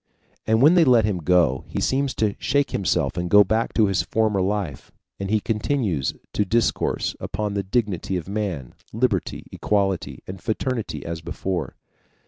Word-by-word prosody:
And 110 +2 +3
when 155 +4 +7
they 175 -2 +6
let 120 -7 +5
him 100 -4 -1
go, 85 -6 +2
he - - -4
seems 135 0 0
to 105 -2 +1
shake 140 -2 +1
himself 95 -2 0
and 90 0 -2
go 105 +2 +8
back 110 +4 0
to 110 - +5
his 100 -2 +1
former 110 -3 +1
life, 95 -7 -2 0.3
and 100 -1 -3
he 110 +1 +3
continues 105 - -1 0.2
to 105 - +2
discourse 115 +3 0
upon 105 0 -3
the 100 - 0
dignity 95 -3 -1
of 90 - -6
man, 95 - -3 0.2
liberty, 110 -6 -1
equality, 100 -3 -1
and 95 0 -8
fraternity 115 +1 -3
as 80 -1 -4
before. 85 -3 -4
100 Hz, 165 wpm, -23 LUFS, 90-110 Hz, 0.3 s, go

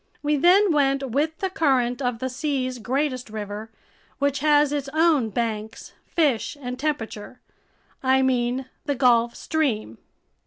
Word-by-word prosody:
We 295 0 +2
then 365 +6 +5
went 275 -3 +1
with 310 +5 0
the 385 -1 -1
current 265 -8 +1
of 245 -3 -1
the 260 - -3
sea's 255 -1 -2
greatest 255 +1 -2
river, 210 0 -6 0.5
which 280 0 0
has 295 0 +4
its 285 -2 -2
own 315 -7 +3
banks, 220 -1 -4
fish, 290 -4 0
and 250 -2 -6
temperature. 250 -6 -4 0.6
I 265 0 +3
mean 255 0 0 0.2
the 285 - 0
Gulf 240 -2 +3
Stream. 240 - -2
265 Hz, 140 wpm, -24 LUFS, 240-295 Hz, 0.6 s, then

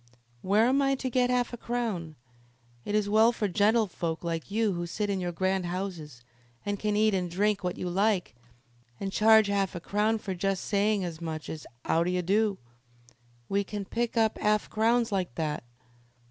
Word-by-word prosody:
"Where 205 +4 +3
am 265 +3 +3
I 275 0 +2
to 260 -1 -4
get 250 0 +2
'arf 250 -1 0
a - - -4
crown? 220 -11 -3 0.7
It 205 - -1
is 210 -1 +2
well 220 +3 +5
for 220 -3 -1
gentlefolk 200 -4 +1
like 165 0 -3
you 215 0 +1
who 175 0 -3
sit 205 +3 -2
in 195 - -1
your 175 -1 -2
grand 185 +1 0
houses, 175 -8 -5 0.4
and 205 -1 -2
can 210 -1 0
eat 215 0 +3
and 180 -2 -1
drink 200 +3 0
what 180 -1 -2
you 180 - -3
like, 195 +1 +1 0.7
an' 195 -1 -3
charge 220 +1 +5
'arf 195 -2 0
a - - -3
crown 210 +5 +1
for 200 -3 -5
just 190 +1 -1
saying 205 0 +1
as 170 -2 -5
much 160 -2 -5
as, 155 -2 -8 0.2
''Ow 165 - +2
d'ye 180 +1 0
do?' 200 +3 +1 0.9
We 200 +1 +1
can't 200 0 -6
pick 235 0 -1
up' 220 -1 +2
arf 210 0 +1
crowns 230 +1 +2
like 185 -10 -2
that. 155 -3 -2
200 Hz, 190 wpm, -28 LUFS, 180-220 Hz, 0.9 s, well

